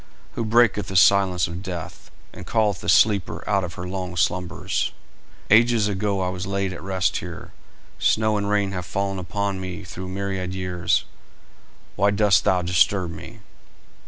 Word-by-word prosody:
"Who 115 - -3
breaketh 110 -2 +3
the 95 - -6
silence 95 -1 +4
of 85 +2 -6
death, 90 -4 -7 0.2
and - - -10
calleth 105 -5 +1
the - - -3
sleeper 100 -6 +3
out 100 -2 +1
of 85 -1 -6
her 90 - -6
long 90 -1 -5
slumbers? 90 0 -1 0.6
Ages 115 -1 +5
ago 100 -1 -1
I 90 - 0
was 90 +1 -5
laid 100 -1 -1
at 90 - -9
rest 95 -1 0
here, - - -8 0.5
snow 110 -1 +2
and 100 -1 -1
rain 100 -1 +1
have 90 -3 -5
fallen 100 -1 -2
upon 95 +2 -3
me 95 +1 -6
through 95 0 -8
myriad 95 -1 -3
years; 90 -2 0 0.9
why 100 0 +3
dost 100 -2 +3
thou 90 -1 +2
disturb 90 0 +2
me?" 80 - -10
95 Hz, 160 wpm, -23 LUFS, 90-100 Hz, 0.9 s, Ages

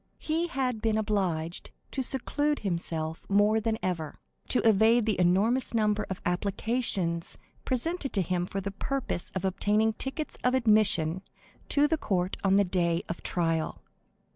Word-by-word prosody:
He 325 +2 -1
had 255 -7 -2
been 220 -1 +1
obliged 185 -6 -1 0.2
to 270 - -1
seclude 290 +3 -1
himself 165 -4 -2
more 205 +2 +4
than 220 0 0
ever, 165 -5 -3 0.3
to 250 - +2
evade 220 +2 +5
the 215 -5 0
enormous 210 +9 +2
number 215 -1 +1
of 190 - -5
applications 190 -2 0 0.3
presented 275 +3 -1
to 195 - +1
him 175 0 -1
for 195 - -3
the 200 +1 -4
purpose 260 -2 -3
of 190 0 -2
obtaining 210 +3 +2
tickets 270 +7 -4
of 250 +1 +3
admission 210 -8 +3 0.5
to 290 +1 +4
the 320 0 0
court 185 -5 -1
on 195 -1 +4
the 200 - +5
day 175 -2 0
of 170 - -5
trial. 165 -2 -1
205 Hz, 150 wpm, -28 LUFS, 180-240 Hz, 0.5 s, evade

